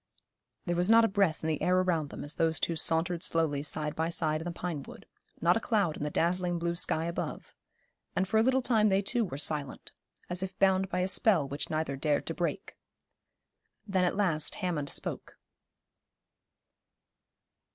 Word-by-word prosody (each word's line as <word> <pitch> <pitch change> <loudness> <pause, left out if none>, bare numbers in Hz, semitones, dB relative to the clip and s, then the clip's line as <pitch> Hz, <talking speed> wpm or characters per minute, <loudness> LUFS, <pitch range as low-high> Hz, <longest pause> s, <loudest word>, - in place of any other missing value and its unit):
There 175 -2 -1
was 175 +3 +1
not 225 0 +7
a - - +3
breath 195 -7 0
in - - -1
the 155 -2 -1
air 180 +1 +2
around 170 -5 0
them - - -8
as 145 - -3
those 160 -1 0
two 170 - -1
sauntered 165 +2 +4
slowly 160 -5 0
side 150 0 -2
by 160 +1 -1
side 155 -2 0
in - - -7
the 175 - -3
pine 170 -3 -4
wood, - - -12 0.4
not 175 +2 +4
a - - +1
cloud 205 -9 0
in - - -9
the 150 - -1
dazzling 175 +3 0
blue 170 0 -2
sky 165 -1 +1
above; 170 0 -5 0.6
and 190 - 0
for 220 +2 +2
a - - +5
little 260 +2 +2
time 220 -4 +3
they 195 +1 +2
too 235 +4 0
were 155 -10 -5
silent, 145 -2 -2 0.4
as 175 +1 -1
if 190 0 -5
bound 190 -1 +2
by 180 - -1
a 185 - 0
spell 190 -6 +3
which 140 0 -5
neither 155 -3 -2
dared 145 +1 0
to 165 - -3
break. 170 +1 -4 1.1
Then 190 -3 0
at 180 - +1
last 165 -7 0
Hammond 160 -6 -3
spoke. - - -4
170 Hz, 190 wpm, -29 LUFS, 155-190 Hz, 1.1 s, not